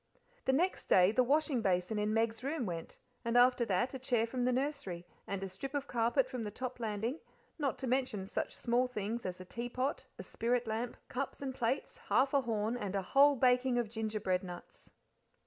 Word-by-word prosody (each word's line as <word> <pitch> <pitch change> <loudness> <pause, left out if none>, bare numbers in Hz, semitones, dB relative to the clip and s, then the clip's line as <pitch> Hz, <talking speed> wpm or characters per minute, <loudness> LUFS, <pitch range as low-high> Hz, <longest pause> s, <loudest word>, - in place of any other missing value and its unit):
The - - +4
next 345 +8 +1
day 185 +1 +6
the 255 - +3
washing 285 -1 +2
basin 190 +1 +1
in 210 0 +1
Meg's 225 +1 0
room 280 -2 -1
went, 170 -3 -5 0.3
and 235 0 +1
after 245 0 +5
that 205 +6 0
a 265 - -4
chair 245 -3 +1
from 245 +1 -2
the 255 - +3
nursery, 255 - -2 0.2
and 195 -1 -3
a - - -2
strip 265 +10 -6
of 280 -1 -1
carpet 240 +1 +2
from 250 -3 -4
the 210 - -3
top 255 +4 -5
landing, 225 +5 -2 0.4
not 280 -3 0
to 265 - -4
mention 250 -6 0
such - - -3
small 245 +2 +2
things 225 -2 -3
as 185 0 -5
a 185 - -8
teapot, 245 +6 -3
a - - -6
spirit 240 +1 0
lamp, 225 +2 -3
cups - - -4
and 270 -2 -3
plates, 255 +1 -1
half 270 +1 +3
a 280 - +4
horn, 225 -1 -1
and 200 -4 -3
a 195 - 0
whole 285 +1 +7
baking 250 0 +3
of 235 -3 0
gingerbread 215 -4 -1
nuts. 180 -1 -10
240 Hz, 200 wpm, -34 LUFS, 210-260 Hz, 0.4 s, whole